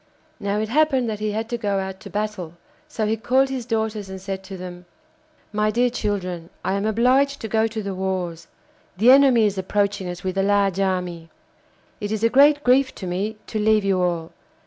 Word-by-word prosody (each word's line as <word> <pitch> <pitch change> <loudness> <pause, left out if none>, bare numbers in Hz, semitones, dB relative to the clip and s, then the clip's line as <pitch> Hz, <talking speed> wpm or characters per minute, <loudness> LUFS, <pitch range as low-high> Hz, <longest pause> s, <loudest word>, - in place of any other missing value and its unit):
Now 200 0 -1
it 215 0 -2
happened 270 -2 +2
that 210 - -5
he 215 0 -1
had 220 +2 -3
to 240 - -3
go 200 -2 0
out 190 0 -4
to 200 - -10
battle, 205 -5 -4 0.3
so 220 - -2
he 215 +1 +1
called 260 +4 +2
his 255 -3 -4
daughters 220 -3 -2
and 190 0 -7
said 190 0 -5
to 190 0 -8
them: 180 -1 -9 0.7
'My 210 0 +1
dear 245 +3 +2
children, 185 -7 -3 0.2
I 190 - +1
am 200 +2 -1
obliged 260 +6 +2
to 225 - -4
go 220 +1 +2
to 220 -1 -5
the 200 -1 -3
wars. 185 -3 -3 0.5
The 230 +6 +6
enemy 265 -5 +6
is 200 -2 0
approaching 200 0 -1
us 175 0 -7
with 190 +1 -2
a - - +4
large 200 -1 +2
army. 180 -4 -2 0.7
It 205 -2 -4
is 220 0 -2
a 230 - +5
great 290 +3 +5
grief 260 +2 +3
to 190 - -7
me 195 +5 -3
to 220 - -4
leave 215 0 +3
you 190 -2 +2
all. 170 -2 -1
210 Hz, 210 wpm, -22 LUFS, 190-225 Hz, 0.7 s, The